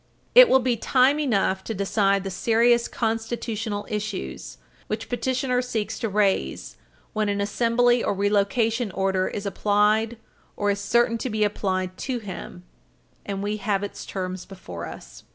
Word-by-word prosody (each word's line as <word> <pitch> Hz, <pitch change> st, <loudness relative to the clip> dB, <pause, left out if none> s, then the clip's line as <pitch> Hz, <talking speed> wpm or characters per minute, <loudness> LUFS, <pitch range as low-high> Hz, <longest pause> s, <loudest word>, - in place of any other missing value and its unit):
It -, -, +9 dB
will 265 Hz, -, +6 dB
be 250 Hz, -2 st, +1 dB
time 260 Hz, +5 st, +3 dB
enough 200 Hz, -8 st, +1 dB
to 225 Hz, -, -3 dB
decide 200 Hz, 0 st, +1 dB
the 195 Hz, -, -4 dB
serious 235 Hz, +4 st, +3 dB
constitutional 225 Hz, -2 st, -3 dB
issues 205 Hz, -, -5 dB, 0.3 s
which 220 Hz, +1 st, -4 dB
petitioner 255 Hz, 0 st, 0 dB
seeks 235 Hz, -4 st, -3 dB
to 225 Hz, -, -1 dB
raise 195 Hz, -, 0 dB, 0.4 s
when 215 Hz, -1 st, 0 dB
an 200 Hz, 0 st, -1 dB
assembly 235 Hz, +4 st, +2 dB
or -, -, +1 dB
relocation 210 Hz, +3 st, +1 dB
order 190 Hz, -1 st, +1 dB
is 205 Hz, -, -5 dB
applied 210 Hz, +3 st, +2 dB, 0.4 s
or 205 Hz, 0 st, +1 dB
is 200 Hz, -, -2 dB
certain 230 Hz, +3 st, +2 dB
to 255 Hz, -, -3 dB
be 215 Hz, -1 st, 0 dB
applied 185 Hz, -3 st, -1 dB
to 260 Hz, -2 st, -2 dB
him, 190 Hz, -4 st, -8 dB, 0.6 s
and 200 Hz, -1 st, -3 dB
we 210 Hz, +1 st, -1 dB
have 200 Hz, -1 st, -1 dB
its 205 Hz, -, -6 dB
terms 185 Hz, -1 st, -5 dB
before 90 Hz, -, -8 dB
us. -, -, -11 dB
210 Hz, 150 wpm, -24 LUFS, 195-235 Hz, 0.6 s, It